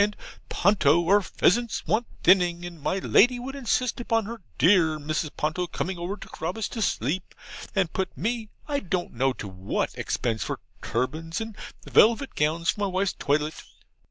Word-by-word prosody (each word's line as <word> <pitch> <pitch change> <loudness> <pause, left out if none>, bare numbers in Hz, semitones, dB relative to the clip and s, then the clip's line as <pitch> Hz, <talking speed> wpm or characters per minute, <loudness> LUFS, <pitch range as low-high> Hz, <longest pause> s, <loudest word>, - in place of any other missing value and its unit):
and 210 0 -1 0.3
"Ponto, 175 -4 +3
our 205 +2 +5
pheasants 230 +4 +1
want 225 +2 +1 0.2
thinning," 175 -2 +4
and 170 -3 -9
my 185 - 0
Lady 245 +5 +4
would 265 +3 -6
insist 255 -2 0
upon 225 -2 0
her 230 +1 -7 0.2
dear 165 -4 +4
Mrs. 155 +1 -2
Ponto 160 +4 -1
coming 180 +1 -3
over 180 +4 -3
to - - -10
Carabas 185 +6 -3
to 225 - -5
sleep, 175 - -1 0.4
and 185 -5 +1
put 190 -1 -3
me 225 -1 -2 0.2
I 285 -2 0
don't 180 -5 -3
know 130 +3 +2
to 110 - -7
what 95 0 -2
expense 115 -2 -2
for - - -4 0.2
turbans 155 +8 -2
and 225 -1 -5 0.3
velvet 235 +5 +4
gowns 165 +4 +1
for - - -11
my 200 - +2
wife's 190 +1 0
toilette. 150 +2 -1
185 Hz, 170 wpm, -26 LUFS, 155-215 Hz, 0.4 s, our